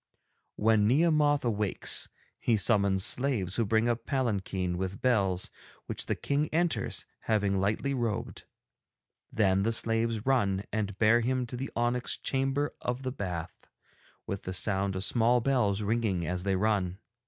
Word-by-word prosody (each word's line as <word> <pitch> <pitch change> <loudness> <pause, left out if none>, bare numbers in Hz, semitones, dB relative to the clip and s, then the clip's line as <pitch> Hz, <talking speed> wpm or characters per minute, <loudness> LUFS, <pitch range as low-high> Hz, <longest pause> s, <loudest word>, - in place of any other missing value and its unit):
'When 105 -1 +3
Nehemoth 145 0 +3
awakes 105 -4 +1 0.3
he 115 - +2
summons 100 -2 +3
slaves 120 -10 +1
who 115 - +2
bring 110 +2 +2
a 120 - +2
palanquin 100 -9 -2
with 95 +3 -4
bells, 100 -7 +1 0.3
which - - -4
the - - 0
King 145 +2 -1
enters, 170 +1 0 0.2
having 100 -3 +1
lightly 110 +8 0
robed. 115 -5 -3 0.9
Then 95 -3 +2
the 110 +3 +1
slaves 115 -1 +1
run 100 -8 +1
and 105 -2 -2
bear 115 +2 +4
him 130 +1 0
to 120 - -7
the 135 +3 -4
onyx 120 +1 0
Chamber 135 +2 -1
of 125 +2 -3
the 130 - -2
Bath, 90 -9 -6 0.6
with 100 - -4
the 95 - -5
sound 95 +1 0
of 95 - -2
small 120 +4 +3
bells 110 -6 +1
ringing 105 -5 0
as 90 +2 -2
they 95 -1 +1
run. 95 -2 0
110 Hz, 150 wpm, -29 LUFS, 95-125 Hz, 0.9 s, bear